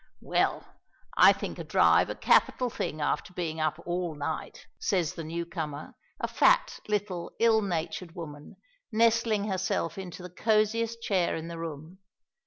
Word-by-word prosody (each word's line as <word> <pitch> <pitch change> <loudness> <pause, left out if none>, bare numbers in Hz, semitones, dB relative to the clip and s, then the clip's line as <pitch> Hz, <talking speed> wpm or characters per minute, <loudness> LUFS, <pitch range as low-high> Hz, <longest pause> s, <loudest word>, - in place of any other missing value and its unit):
"Well, - - +1 0.5
I - - +8
think - - -4
a - - -4
drive - - +4
a - - -3
capital 250 -2 +3
thing 155 -6 -3
after 145 +4 -1
being 160 -2 -3
up 155 0 0
all 175 -2 -2
night," 150 +2 -5
says 180 -4 0
the 165 - -6
new 170 +2 -4
comer, 155 -4 -5 0.3
a - - -1
fat, - - +3
little, 200 -5 -2
ill 225 -1 +4
natured 170 -2 -3
woman, 150 -3 -9 0.4
nestling 225 -1 +3
herself 190 -3 -1
into 180 -1 -8
the 180 - -8
cosiest 225 +3 +1
chair 185 -4 +1
in 165 +1 -5
the 170 -1 -6
room. 165 +2 -7
175 Hz, 155 wpm, -28 LUFS, 160-210 Hz, 0.5 s, I